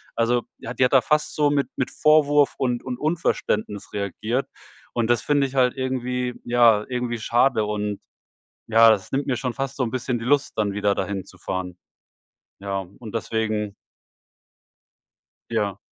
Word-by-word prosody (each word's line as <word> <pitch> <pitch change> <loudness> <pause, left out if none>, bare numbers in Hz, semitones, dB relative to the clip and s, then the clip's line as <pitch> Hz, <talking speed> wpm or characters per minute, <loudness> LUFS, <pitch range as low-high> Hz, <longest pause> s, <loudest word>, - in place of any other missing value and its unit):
Also, 120 +1 +1 0.2
ja, 120 - -6
die 130 - +3
hat 125 - 0
da 135 - +7
fast 150 0 0
so 150 -1 +3
mit 140 -3 +1
mit 130 - -2
Vorwurf 150 -2 +4
und 125 -2 0
und 125 -1 -4
Unverständnis 125 - -1
reagiert. 110 +5 -2 0.5
Und 120 -1 0
das 120 - +3
finde 145 -2 +2
ich 135 - -11
halt 125 -2 +3
irgendwie, 125 -1 -2
ja, 120 -3 +5
irgendwie 125 -2 -2
schade 120 +1 +2
und 105 -1 -2 0.7
ja, 115 0 +7
es 100 +3 -8
nimmt 135 +1 0
mir 130 - 0
schon 125 -3 -3
fast 135 0 -4
so 135 - -1
'n 115 - -3
bisschen 125 0 -2
die 115 - -7
Lust, 145 +1 +2
dann 105 -2 0
wieder 100 0 +1
dahin 100 -1 -3
zu 95 - -15
fahren. 90 0 -4 0.8
Ja, 95 -1 -3
und 115 -3 -10
deswegen 110 -2 -1 1.8
Ja. 105 -4 -1
120 Hz, 165 wpm, -23 LUFS, 105-130 Hz, 1.8 s, da